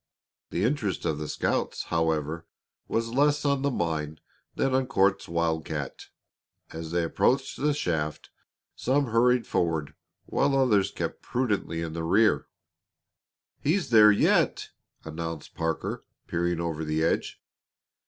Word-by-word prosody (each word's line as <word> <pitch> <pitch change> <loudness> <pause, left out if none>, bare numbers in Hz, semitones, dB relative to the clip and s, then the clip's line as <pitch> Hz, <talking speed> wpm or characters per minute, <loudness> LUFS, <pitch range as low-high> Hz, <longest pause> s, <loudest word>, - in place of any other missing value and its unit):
The - - -1
interest 115 -6 -1
of 75 -2 0
the 75 - -4
scouts, - - -1
however, 80 0 0 0.4
was 115 0 -1
less 145 +2 +2
on 140 -1 +2
the 140 - +1
mine 80 - -2 0.4
than 135 -1 +1
on 130 0 +2
Court's 95 -6 +2
"wildcat." 80 -3 -2 0.6
As 80 0 -6
they 85 +1 0
approached 135 +10 +1
the 150 +1 +3
shaft 80 - -2 0.4
some 135 -1 0
hurried 125 +1 +3
forward 80 -4 -1 0.3
while 140 0 +1
others 110 -8 +3
kept - - -4
prudently 105 -9 -1
in 80 -1 -5
the 85 - -3
rear. 105 +7 +3 1.1
"He's 165 0 0
there 105 -2 +8
yet!" 100 - +2 0.4
announced 80 -1 -6
Parker, 80 -1 -3 0.2
peering 85 0 -1
over 80 -2 -2
the 80 +1 0
edge. 80 - 0
85 Hz, 130 wpm, -27 LUFS, 80-125 Hz, 1.1 s, there